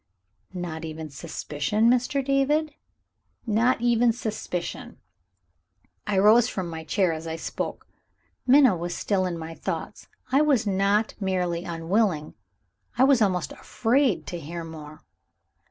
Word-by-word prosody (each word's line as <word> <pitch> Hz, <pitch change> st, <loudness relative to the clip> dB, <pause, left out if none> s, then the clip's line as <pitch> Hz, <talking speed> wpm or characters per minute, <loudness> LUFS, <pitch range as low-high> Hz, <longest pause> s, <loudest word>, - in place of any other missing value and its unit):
"Not 170 Hz, -3 st, -5 dB
even 160 Hz, -1 st, -6 dB
suspicion, 155 Hz, +6 st, -1 dB
Mr. 250 Hz, +3 st, +2 dB
David?" 285 Hz, +3 st, +1 dB, 0.7 s
"Not 230 Hz, +2 st, +2 dB
even 240 Hz, 0 st, +3 dB
suspicion." 215 Hz, -6 st, -5 dB, 1.1 s
I 205 Hz, -2 st, 0 dB
rose 220 Hz, +4 st, +6 dB
from 180 Hz, -3 st, -4 dB
my 160 Hz, 0 st, -6 dB
chair 180 Hz, +1 st, +1 dB
as 160 Hz, +1 st, -6 dB
I 160 Hz, -, -3 dB
spoke. 165 Hz, -, -5 dB, 0.6 s
Minna 260 Hz, -5 st, +6 dB
was 175 Hz, +1 st, -4 dB
still 190 Hz, -3 st, 0 dB
in 175 Hz, -2 st, -3 dB
my 165 Hz, 0 st, -7 dB
thoughts; -, -, -5 dB, 0.2 s
I 275 Hz, +3 st, +4 dB
was 275 Hz, -7 st, +3 dB
not 200 Hz, +2 st, +1 dB
merely 180 Hz, -3 st, -1 dB
unwilling, 170 Hz, -1 st, 0 dB, 0.6 s
I 255 Hz, -, +5 dB
was 270 Hz, -3 st, +5 dB
almost 185 Hz, -5 st, +1 dB
afraid 235 Hz, -, 0 dB
to 175 Hz, -, -5 dB
hear 165 Hz, +2 st, -6 dB
more. 155 Hz, -2 st, -10 dB
190 Hz, 130 wpm, -25 LUFS, 165-235 Hz, 1.1 s, rose